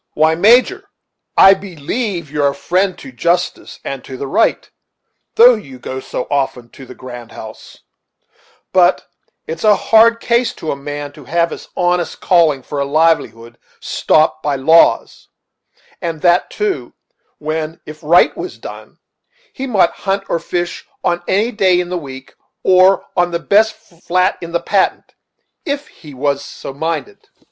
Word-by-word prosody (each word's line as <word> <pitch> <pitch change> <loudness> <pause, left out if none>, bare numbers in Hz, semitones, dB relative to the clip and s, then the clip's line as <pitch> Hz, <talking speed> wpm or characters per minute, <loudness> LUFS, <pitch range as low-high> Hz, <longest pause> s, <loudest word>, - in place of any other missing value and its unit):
"Why, 155 +1 +3
Major, 250 - +3 0.5
I 195 - +8
believe 190 - -4
you're 150 -1 +1
a 140 - -1
friend 185 +1 0
to 265 - -11
justice 175 -5 -2
and 135 -2 -5
the 130 +1 -7
right, 135 +11 +1 0.7
though 245 +2 +8
you 140 - -8
go 130 +1 -6
so 125 - -5
often 135 -4 -2
to 135 +1 -13
the 125 - -11
grand 120 -2 -10
house; - - -11 0.9
but - - +3 0.4
it's 160 +1 -6
a 210 -1 +5
hard 230 +2 +4
case 235 +1 +1
to 160 - -4
a - - -2
man 145 +1 -6
to 145 -1 -15
have 170 +3 0
his - - -8
honest 175 -1 0
calling 160 -7 +2
for 145 - -5
a - - +1
livelihood 140 -6 0 0.2
stopped 155 0 +1
by 145 -2 -1
laws, 160 +5 +3 0.7
and 165 -4 -4
that, 175 0 +3
too, 410 -3 -3 0.4
when, 155 +1 -4
if 155 0 -10
right 170 +4 +4
was 365 - -7
done, - - -11 0.6
he 270 - -5
mought 195 -8 +2
hunt 195 0 -2
or 170 - 0
fish 175 +1 -4 0.2
on 175 0 0
any 210 +5 +1
day 190 -5 +2
in 175 -1 -3
the 180 - -3
week, 135 -3 -10 0.3
or 185 +1 +4
on 175 -1 +2
the 170 - -1
best 215 +5 +3
flat 185 -3 -1
in 170 -1 -7
the 170 - 0
Patent, 195 -2 0 0.5
if 285 0 -4
he 150 - -14
was 140 +1 -1
so 140 - -9
minded." 150 -5 -5
170 Hz, 155 wpm, -16 LUFS, 145-195 Hz, 0.9 s, I